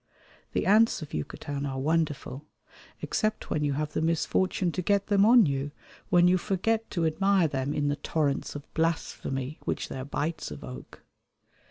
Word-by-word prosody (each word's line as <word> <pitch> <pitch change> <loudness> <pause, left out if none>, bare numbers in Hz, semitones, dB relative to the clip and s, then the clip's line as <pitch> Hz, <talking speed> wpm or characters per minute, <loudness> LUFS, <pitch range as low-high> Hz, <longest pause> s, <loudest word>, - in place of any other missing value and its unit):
The - - 0
ants 215 -3 +4
of 150 - -11
Yucatan 140 - -4
are 135 -1 -4
wonderful, 150 -1 -1 0.6
except 215 -1 -1
when 150 - 0
you 145 -1 +1
have 150 +2 -3
the - - 0
misfortune 170 +2 +1
to 185 - -2
get 200 +2 +2
them 205 0 +4
on 235 -2 +7
you, 140 -1 -1 0.4
when 175 -2 +5
you 185 +1 +4
forget 220 +4 0
to 170 -3 -1
admire 195 +2 +3
them 135 -1 -2
in 145 -1 0
the 145 0 0
torrents 145 -1 -1
of 145 0 -9
blasphemy 155 -4 -2
which - - -2
their 130 - -5
bites 150 +4 -3
evoke. 125 -3 -9
160 Hz, 165 wpm, -28 LUFS, 145-190 Hz, 0.6 s, on